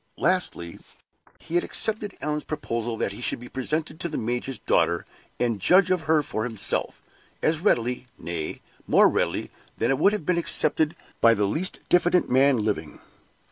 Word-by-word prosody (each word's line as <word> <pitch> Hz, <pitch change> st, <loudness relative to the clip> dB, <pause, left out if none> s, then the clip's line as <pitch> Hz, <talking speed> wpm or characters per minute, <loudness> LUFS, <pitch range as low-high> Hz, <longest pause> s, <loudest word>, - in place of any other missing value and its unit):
Lastly, 170 Hz, -, -1 dB, 0.6 s
he 165 Hz, -, -12 dB
had 175 Hz, -, +3 dB
accepted 215 Hz, -2 st, -2 dB
Allan's 150 Hz, 0 st, -2 dB
proposal 115 Hz, -6 st, -3 dB
that -, -, -1 dB
he 100 Hz, -, -8 dB
should -, -, -2 dB
be 120 Hz, -, -10 dB
presented 155 Hz, +5 st, -3 dB
to 170 Hz, -, -2 dB
the -, -, -4 dB
major's 120 Hz, +3 st, -2 dB
daughter, 85 Hz, 0 st, +1 dB, 0.3 s
and 115 Hz, -5 st, 0 dB
judge 185 Hz, -, +5 dB
of 180 Hz, -3 st, 0 dB
her 155 Hz, -2 st, +4 dB
for 110 Hz, -6 st, -3 dB
himself, 110 Hz, -4 st, -2 dB, 0.4 s
as 155 Hz, 0 st, +2 dB
readily, 125 Hz, -, +1 dB
nay, 85 Hz, -2 st, -5 dB, 0.3 s
more -, -, +6 dB
readily -, -, -1 dB, 0.3 s
than 115 Hz, +3 st, +1 dB
it 135 Hz, -, +1 dB
would 200 Hz, +6 st, +4 dB
have 210 Hz, -8 st, -3 dB
been 180 Hz, 0 st, +2 dB
accepted 160 Hz, -1 st, +1 dB, 0.2 s
by 115 Hz, 0 st, +6 dB
the 105 Hz, -1 st, +1 dB
least 160 Hz, -, -1 dB
diffident 175 Hz, -2 st, +3 dB
man 135 Hz, +1 st, +5 dB
living. 80 Hz, -8 st, -3 dB
135 Hz, 170 wpm, -25 LUFS, 115-170 Hz, 0.6 s, more